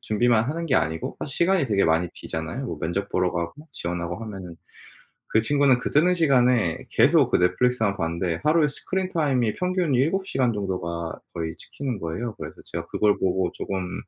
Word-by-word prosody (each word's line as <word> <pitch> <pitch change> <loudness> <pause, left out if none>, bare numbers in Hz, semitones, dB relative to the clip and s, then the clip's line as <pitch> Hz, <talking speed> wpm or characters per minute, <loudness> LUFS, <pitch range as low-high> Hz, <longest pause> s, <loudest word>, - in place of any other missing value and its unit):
준비만 115 +1 +2
하는 165 +3 -3
게 130 - +1
아니고 80 0 0
사실 135 - -5
시간이 175 -3 +2
되게 100 -4 +2
많이 80 +2 +2
비잖아요. 80 +12 -5
뭐 - - -5
면접 95 +5 -2
보러 90 -2 +1
가고 85 - -5
지원하고 85 -6 -4
하면은. 95 -5 -8 0.8
그 110 - +6
친구는 140 +1 +3
그 - - -3
뜨는 170 +5 +4
시간에 125 - +3
계속 - - +4
그 - - +4
넷플릭스만 110 +3 +2
봤는데 85 -1 -2
하루에 155 0 +4
스크린타임이 150 - 0
평균 180 -5 0
7 165 +10 +1
시간 130 -6 +1
정도가 90 -5 -3
거의 80 -1 -4
찍히는 130 -7 -5
거예요. 90 +8 -4
그래서 - - -8
제가 85 0 -5
그걸 105 -1 +2
보고 95 -1 +1
쪼금 95 -2 -4
110 Hz, 390 characters per minute, -24 LUFS, 90-140 Hz, 0.8 s, 그